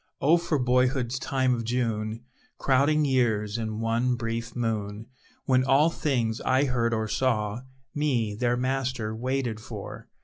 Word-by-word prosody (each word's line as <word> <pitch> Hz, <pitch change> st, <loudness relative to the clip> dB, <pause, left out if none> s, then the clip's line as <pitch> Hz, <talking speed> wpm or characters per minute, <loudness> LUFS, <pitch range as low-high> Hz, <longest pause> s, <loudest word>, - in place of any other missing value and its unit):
Oh 160 Hz, +5 st, +5 dB
for 170 Hz, -2 st, -1 dB
boyhood's 125 Hz, 0 st, +1 dB
time 130 Hz, -2 st, +1 dB
of 115 Hz, -1 st, -2 dB
June, 115 Hz, -2 st, -2 dB, 0.3 s
Crowding 145 Hz, +3 st, +3 dB
years 115 Hz, -5 st, +1 dB
in 110 Hz, -1 st, -3 dB
one 115 Hz, +2 st, +1 dB
brief 115 Hz, 0 st, -4 dB
moon, 110 Hz, -3 st, -2 dB, 0.4 s
When 130 Hz, -1 st, +3 dB
all 140 Hz, +5 st, +4 dB
things 120 Hz, -8 st, -1 dB
I 130 Hz, +2 st, +2 dB
heard 120 Hz, -3 st, 0 dB
or 110 Hz, -1 st, -1 dB
saw, 110 Hz, -2 st, 0 dB, 0.3 s
Me, 125 Hz, -8 st, 0 dB
their 120 Hz, +3 st, 0 dB
master, 130 Hz, -3 st, -1 dB
waited 125 Hz, -1 st, -2 dB
for. -, -, -8 dB
125 Hz, 140 wpm, -27 LUFS, 110-130 Hz, 0.4 s, Oh